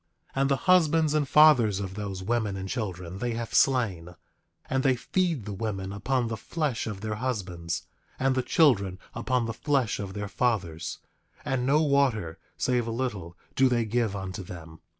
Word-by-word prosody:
9:8 135 - +1
And 135 - +2
the 140 - +4
husbands 160 -2 +3
and 150 -2 +1
fathers 130 -9 +6
of 95 -2 -4
those 100 -2 -5
women 110 -2 -1
and 95 0 -5
children 95 -4 -4
they 120 +1 -1
have 115 0 -5
slain; 95 -10 +2 0.5
and 130 0 0
they 135 -1 +3
feed 165 - -1
the 105 - -5
women 95 -1 -4
upon 120 +4 0
the 110 -1 -3
flesh 145 0 -2
of 105 -3 -5
their 110 0 -3
husbands, 95 -8 -3 0.3
and 135 0 +2
the 130 - +1
children 105 - +3 0.2
upon 125 0 0
the 115 - -3
flesh 135 -3 0
of 100 -1 -5
their 105 0 -3
fathers; 95 -7 -1 0.5
and 130 -1 0
no 150 +3 +4
water, 130 - +1 0.2
save 125 -2 +1
a - - -2
little, 105 -8 -4 0.2
do 130 -1 +4
they 120 -2 +1
give 110 -2 0
unto 95 -1 -5
them. 85 -3 -10
115 Hz, 180 wpm, -27 LUFS, 95-130 Hz, 0.5 s, fathers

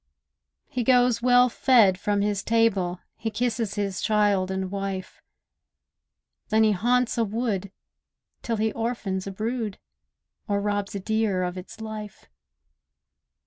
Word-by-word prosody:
He 250 - -2
goes 245 -1 +4
well 245 0 +5
fed 225 -6 +4
from 205 +1 0
his 205 -1 0
table; 200 -6 +1 0.2
He 225 - -3
kisses 225 -1 -1
his 200 -3 -2
child 205 -3 +2
and 190 -1 -3
wife; 195 -1 -5 1.3
Then 220 0 +4
he 215 - +4
haunts 240 +5 +1
a - - +4
wood, 210 -3 -2 0.7
till 230 -1 -2
he 220 +1 +1
orphans 220 -5 -3
a - - -3
brood, 220 +1 -3 0.7
Or 200 -1 +1
robs 205 0 -2
a - - -2
deer 215 -2 0
of 180 0 -3
its 185 +3 -9
life. 215 -2 -7
210 Hz, 135 wpm, -25 LUFS, 195-230 Hz, 1.3 s, well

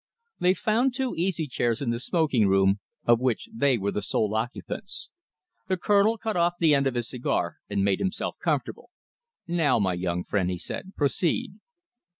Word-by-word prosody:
They 180 +1 +3
found 240 +6 +1
two 260 -1 -1
easy 175 -1 -1
chairs 120 -4 -1
in 130 -4 -1
the 115 - -2
smoking 140 - +2
room, 95 +1 +3 0.3
of 120 -1 +5
which 130 - 0
they 140 - +2
were 100 -1 -1
the 105 - -2
sole 105 +1 0
occupants. 125 - -4 0.6
The 185 - 0
Colonel 205 +4 +3
cut 220 -1 -3
off 175 0 +2
the 160 -3 +5
end 140 -1 +3
of 130 - -2
his 120 -1 -1
cigar 125 -1 -2
and 100 - +1
made 100 -1 +2
himself 190 - -2
comfortable. - - -2 0.6
"Now, 165 -7 +2
my 95 -4 +1
young 90 0 -2
friend," 95 -3 0
he 90 - -2
said, 190 - -7
"proceed." 145 +4 0
135 Hz, 175 wpm, -26 LUFS, -, 0.6 s, of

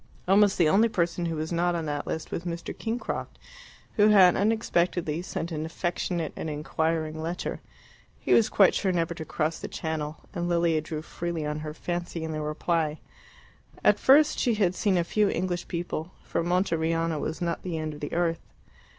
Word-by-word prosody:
Almost 200 +1 +5
the 170 - +4
only 215 +8 +4
person 170 -3 0
who 165 - -2
was 155 +1 -3
not 175 +1 +1
on 165 -2 -2
that 145 -1 -3
list 160 - -4
was 170 - -3
Mr. 170 -1 -5
Kingcroft, 230 +2 -4 0.6
who 210 0 +6
had 190 -4 +7
unexpectedly 175 -6 +1
sent 170 -1 -4
an 155 -1 -3
affectionate 175 0 -2
and 160 - -4
inquiring 155 +1 -1
letter. 170 +2 -4 0.6
He - - +1
was 225 - +5
quite 195 -3 +5
sure 190 - +1
never 170 -1 0
to 165 -1 -6
cross 155 +1 -2
the - - -5
Channel, 155 -1 -4 0.2
and 175 -2 -2
Lilia 170 -2 +2
drew 155 0 -5
freely 170 -1 -4
on 150 +1 -2
her 155 0 -6
fancy 175 -1 -4
in 160 - -3
the 155 0 -3
reply. 155 0 -1 0.8
At - - +5
first 295 +3 +5
she 240 -4 +2
had 190 -4 +2
seen 190 0 +1
a 170 - +2
few 210 +4 +2
English 175 0 -2
people, 170 -1 -4
for - - -1
Monteriano 165 -2 +1
was 160 - -3
not 170 -1 -2
the 175 -3 -3
end 155 -1 -3
of 150 - -10
the 145 - -5
earth. 165 -1 0
170 Hz, 185 wpm, -27 LUFS, 160-180 Hz, 0.8 s, had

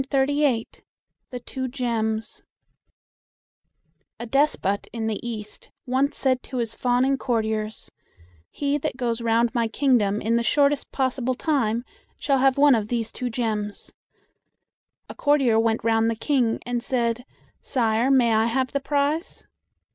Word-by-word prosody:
THE 275 -3 +1 0.6
TWO 260 -1 -4
GEMS 225 -4 -2 1.8
A 235 - -5
despot 240 -6 +1
in 230 -1 -4
the 220 -2 -2
East 215 -3 -7 0.2
once 270 +3 0
said 260 -2 +1
to 260 - -7
his 230 -2 -1
fawning 255 +3 +1
courtiers, 220 -3 -2 0.6
"He 285 0 -1
that 260 - -3
goes 240 -2 -2
round 230 0 +2
my 235 -2 +1
kingdom 225 -5 +2
in 230 +2 +1
the - - +1
shortest 285 +2 +2
possible 260 -1 -1
time 245 -6 0 0.3
shall 275 -2 +1
have 270 0 +3
one 285 0 +6
of 215 -3 0
these 230 -1 -2
two 250 - -4
gems." 215 -3 -3 1.1
A - - -8
courtier 275 -6 +3
went 225 0 +1
round 225 0 +2
the 230 - -1
King, 240 -1 +1
and 245 -1 -2
said, 235 -1 -1 0.4
"Sire, 230 -1 +1
may 250 -4 +4
I 220 +1 +3
have 260 +2 0
the 280 - 0
prize?" 290 +4 -1
240 Hz, 140 wpm, -24 LUFS, 225-270 Hz, 1.8 s, one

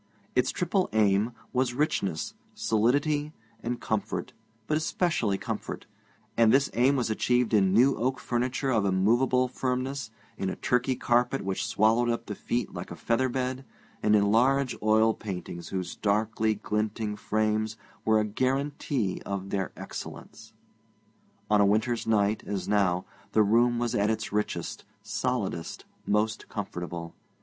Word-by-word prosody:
Its - - +3
triple 185 +1 0
aim, 105 +1 +3 0.2
was 125 -1 +1
richness, 100 - -1 0.2
solidity, 145 +7 +1 0.3
and 120 +1 -3
comfort, 100 -5 -2 0.3
but 150 - 0
especially 155 - 0
comfort; - - -5 0.5
and 115 -1 +5
this 135 +2 +3
aim 130 +4 +4
was 120 -4 0
achieved 125 +1 +1
in 95 -3 +4
new 125 +7 +5
oak 130 +2 0
furniture 130 +2 -1
of 110 -4 +2
immovable 120 +7 +3
firmness, 130 0 -2 0.3
in 95 - -1
a - - -3
Turkey 125 +1 +1
carpet 125 +2 +1
which 95 +1 -1
swallowed 115 +2 +3
up 115 - -1
the 105 - -4
feet 120 +4 -2
like - - -6
a - - -6
feather 130 +3 +1
bed, 130 +1 -2 0.4
and 105 0 +4
in 100 -1 +3
large 130 +3 +3
oil 110 +1 +4
paintings, 90 -5 -6
whose 95 -2 -3
darkly 110 +1 +1
glinting 105 +1 -2
frames 110 +1 0 0.3
were 110 -1 +4
a 105 - +1
guarantee 130 -2 -1
of 100 -1 -4
their 95 -3 -1
excellence. - - -8 1.0
On 105 -1 +4
a - - +6
winter's 110 +4 +1
night, 105 -1 +2
as 95 -3 -3
now, 95 -3 +2 0.3
the 110 - +5
room 120 +3 +3
was 120 -1 -1
at 100 +1 +2
its 110 - -2
richest, 105 0 -2 0.2
solidest, 80 -1 -2 0.2
most 110 +1 0
comfortable. 85 -4 -5
110 Hz, 145 wpm, -28 LUFS, 105-125 Hz, 1.0 s, a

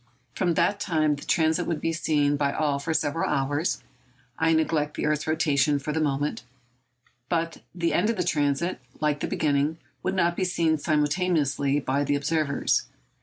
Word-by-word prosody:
From 175 -3 0
that 200 +4 +2
time 155 -4 +1
the 145 - -10
transit 160 +2 +2
would 165 -3 -1
be 165 - -1
seen 145 -3 +1
by 140 -1 +1
all 145 -2 0
for 150 +4 -3
several 160 0 0
hours—I 135 -1 -2
neglect 155 -2 +1
the - - -1
earth's 150 0 0
rotation, 150 -3 +2
for 145 +2 -4
the 160 - 0
moment—but 130 +1 -4
the 170 -2 0
end 215 - +2
of 230 - 0
the 180 - +1
transit, 150 +1 0 0.2
like 150 -1 +1
the - - -2
beginning, 150 +1 0 0.2
would - - -1
not 175 -2 +2
be 185 - -1
seen 165 -3 +1
simultaneously 150 -2 +1
by 140 +1 0
the 145 0 +1
observers. 145 0 0
150 Hz, 165 wpm, -26 LUFS, 140-165 Hz, 0.2 s, that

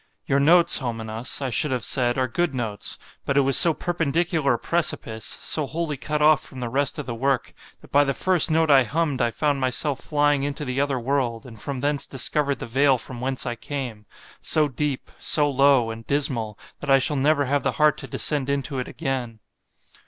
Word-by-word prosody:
——Your 140 - +1
notes, 170 +4 +4
Homenas, 115 +1 -4
I 130 - -2
should 150 - +1
have 125 -2 -2
said, 120 -2 +1
are 130 -1 +1
good 155 +4 -1
notes;——but 120 +4 -4
it - - +6
was 135 -1 +2
so 170 - +8
perpendicular 160 -3 0
a - - -3
precipice——so 145 -2 -2
wholly 160 0 -3
cut 150 +2 -2
off 155 -1 +5
from 130 - -9
the 120 -1 -3
rest 135 +2 0
of 150 - -5
the 120 - -4
work, 130 +2 -1 0.3
that - - -18
by 145 +1 +5
the 140 -1 -1
first 185 -4 +3
note 160 -1 +2
I 135 -1 +7
humm'd 145 +1 -1
I 120 - +2
found 145 +3 -1
myself 130 +2 0
flying 145 -1 +1
into 145 +1 -3
the 130 +1 -1
other 140 -2 0
world, 125 -1 -1
and 115 -4 -12
from 140 -3 -5
thence 145 0 0
discovered 140 +2 -1
the - - -6
vale 135 +3 +3
from 120 +1 -8
whence 130 0 -3
I 120 - -2
came, 120 -6 -6 0.3
so 155 -1 +3
deep, 140 0 -3
so 150 -1 +3
low, 135 -4 +3
and 115 0 -8
dismal, 125 -7 -1 0.2
that 145 - -7
I 135 - +7
shall 140 +3 0
never 145 +1 +2
have 140 +2 0
the 140 -1 -1
heart 150 -1 +2
to - - -8
descend 145 -3 -1
into 140 -1 -2
it 125 - -4
again. 125 -4 -4
140 Hz, 205 wpm, -23 LUFS, 125-150 Hz, 0.3 s, so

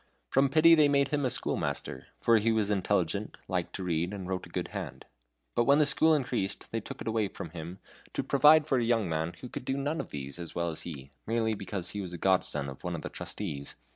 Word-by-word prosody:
From 135 +1 +4
pity 160 +4 +7
they 155 -3 +6
made 140 -1 +3
him 145 -1 0
a - - +2
schoolmaster, 65 - -2
for 115 -1 +4
he 115 +2 +2
was 110 -2 +1
intelligent, 100 0 0
liked 90 -3 -2
to 95 - -4
read, 85 +2 -1
and 95 -2 -6
wrote 95 -1 -3
a - - -17
good - - -3
hand. - - -6 0.5
But 120 - +2
when 140 +2 +6
the 150 - +5
school 155 +3 +4
increased 120 -8 -2
they 115 - -2
took - - -9
it - - -6
away 110 -2 +1
from 85 -4 -8
him 85 +2 -7 0.4
to - - -1
provide 150 +2 +6
for 135 -4 +2
a - - +1
young 115 -4 +2
man 80 +1 -2
who 125 - -6
could 135 +2 -7
do 135 +2 -1
none 145 +4 -1
of - - -10
these 70 +2 -6
as 85 -1 -7
well 85 -1 0
as 80 - -7
he, 70 -5 -8 0.2
merely 115 0 +1
because 100 -3 -4
he 105 - -4
was 90 -2 -6
a - - -4
godson 85 -6 +1
of 65 -1 -9
one - - -2
of - - -6
the - - -4
trustees. 70 -1 -5
105 Hz, 245 wpm, -30 LUFS, 85-135 Hz, 0.5 s, pity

